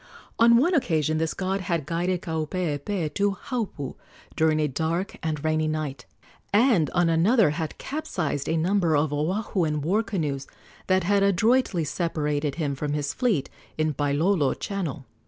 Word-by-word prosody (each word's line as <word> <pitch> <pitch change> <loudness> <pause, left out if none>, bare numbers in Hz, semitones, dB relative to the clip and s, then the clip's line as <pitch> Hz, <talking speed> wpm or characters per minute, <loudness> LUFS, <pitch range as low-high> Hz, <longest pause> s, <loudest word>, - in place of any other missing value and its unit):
On 235 0 +7
one 335 +10 +3
occasion 155 - +1
this 160 -1 -1
god 195 +1 -1
had 170 -6 -1
guided 175 +3 -1
Kaupeepee 160 0 -2
to 200 -1 0
Haupu 210 - -3 0.4
during 160 -1 +2
a 150 - +2
dark 165 +6 -2
and 155 -3 -3
rainy 155 0 +1
night, 150 -5 -3 0.4
and 210 - +4
on 175 -1 +2
another 175 - +4
had 160 0 -4
capsized 175 - -3
a 165 - +1
number 170 -2 +2
of 145 0 +1
Oahuan 160 0 -1
war 190 +9 +2
canoes 150 -11 -3 0.4
that 185 -1 +3
had 200 +3 +2
adroitly 200 0 +2
separated 150 -2 -1
him 150 -4 -1
from 145 +2 -3
his 145 -1 -2
fleet 220 - +1 0.3
in 155 -1 +1
Pailolo 145 +3 +1
channel. 170 -10 -4
165 Hz, 150 wpm, -25 LUFS, 150-195 Hz, 0.4 s, On